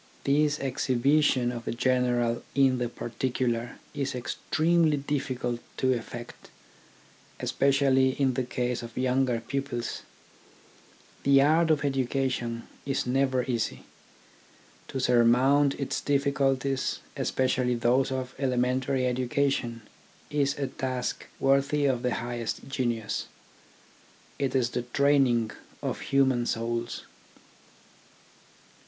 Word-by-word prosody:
This 150 +1 +2
exhibition 135 0 +2
of 120 -1 -7
the - - -2
general 120 -1 +1
in 135 -2 +4
the 120 -1 -1
particular 120 0 -2 0.2
is 140 -1 -2
extremely 155 +5 +1
difficult 130 -4 -2 0.2
to 130 0 +2
effect, 120 0 -7 0.9
especially 135 -1 +2
in 135 -2 +3
the 130 - 0
case 125 0 -2
of 115 0 -10
younger 125 -1 +1
pupils. 135 -4 -3 1.2
The 140 0 +5
art 160 +3 +3
of 150 -2 +2
education 130 -3 -1 0.2
is 135 -1 -1
never 130 0 +1
easy. 120 -4 -2 1.0
To 135 - -4
surmount 130 +4 +4
its 140 - -3
difficulties, 140 -1 0
espe 130 - 0
cially 125 -1 +1
those 130 +3 +2
of 130 0 -3
elementary 130 0 +1
education, 125 -2 0 0.5
is 140 -1 +1
a 140 - -1
task 130 -1 -3
worthy 140 +2 +2
of 130 -3 +1
the 125 -2 0
highest 120 -1 -4
genius. 120 -5 -2 1.1
It 135 -1 -1
is 125 -2 +2
the 125 - -1
training 125 -3 +2 0.3
of - - -2
human 130 -3 +2
souls. 115 +1 -2
130 Hz, 110 wpm, -27 LUFS, 120-140 Hz, 1.2 s, The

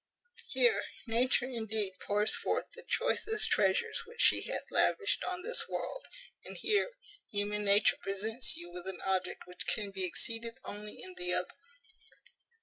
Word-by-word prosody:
Here 475 -3 +3 0.2
Nature 245 +2 +2
indeed 220 -5 0
pours 210 +1 0
forth - - -1
the 480 - -11
choicest 455 -3 +1
treasures 470 -2 +2
which 470 +1 -14
she - - +5
hath - - -4
lavished 410 - +2
on 360 -1 -4
this 480 +3 +5
world; - - -4 0.4
and - - -9
here 430 +3 +1 0.4
human 210 0 -1
nature 200 +1 +5
presents 220 +5 0
you 175 0 -9
with 180 +1 -8
an 190 -2 -5
object 185 -1 -1
which 180 0 -8
can 205 -2 -1
be 190 -1 -4
exceeded 230 +5 -2
only 210 +1 -7
in 370 - -5
the 360 0 -1
other. - - +2
220 Hz, 150 wpm, -32 LUFS, -, 0.4 s, she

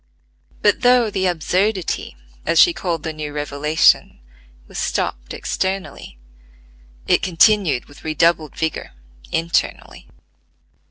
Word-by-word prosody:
But 205 -1 +3
though 245 -3 +4
"the 190 -2 0
absurdity," 180 - -1 0.3
as 165 0 +2
she 345 - +7
called 170 - -3
the 160 - -4
new 150 -1 -6
revelation, 150 +1 +1 0.5
was - - -7
stopped 60 0 -2
externally, 190 - -4 0.9
it - - +3
continued 185 - +3
with 145 - -17
redoubled 155 0 +1
vigor 160 -1 -3 0.4
internally. 165 0 -2
165 Hz, 105 wpm, -20 LUFS, 150-190 Hz, 0.9 s, she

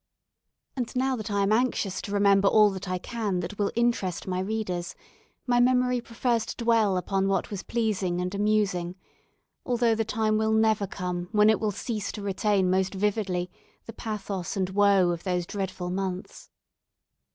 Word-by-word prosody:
And 250 -2 -4
now 260 +1 +1
that 220 -2 -5
I 200 -1 +1
am 195 - +1
anxious 220 -5 +1
to 200 - -7
remember 200 -1 +4
all 210 -1 +5
I 185 0 -1
can 210 -2 -3
that 205 +4 -7
will 205 - +1
interest 235 -7 0
my 185 -1 -2
readers, 185 -3 -3 0.5
my 245 -1 +2
memory 250 0 +3
prefers 235 0 -1
to - - -5
dwell 225 -5 +3
upon 195 +1 0
what 195 0 0
was 200 -2 -4
pleasing 205 -6 -1
and 180 +1 -2
amusing, 200 -4 0 0.7
although 240 -2 +2
the 225 0 0
time 220 -1 0
will 220 0 +1
never 220 -2 +2
come 180 -2 -4
when 210 0 +6
it 220 - +1
will 215 - 0
cease 210 0 -3
to 210 - -6
retain 200 -1 +1
most 190 +1 +1
vividly 190 -3 -1 0.3
the 230 - -8
pathos 200 -5 -4
and 190 -1 -1
woe 200 -2 +4
of 170 -1 -4
those 180 -2 -1
dreadful 190 -2 -4
months. 185 -1 -5
205 Hz, 170 wpm, -27 LUFS, 185-220 Hz, 0.7 s, when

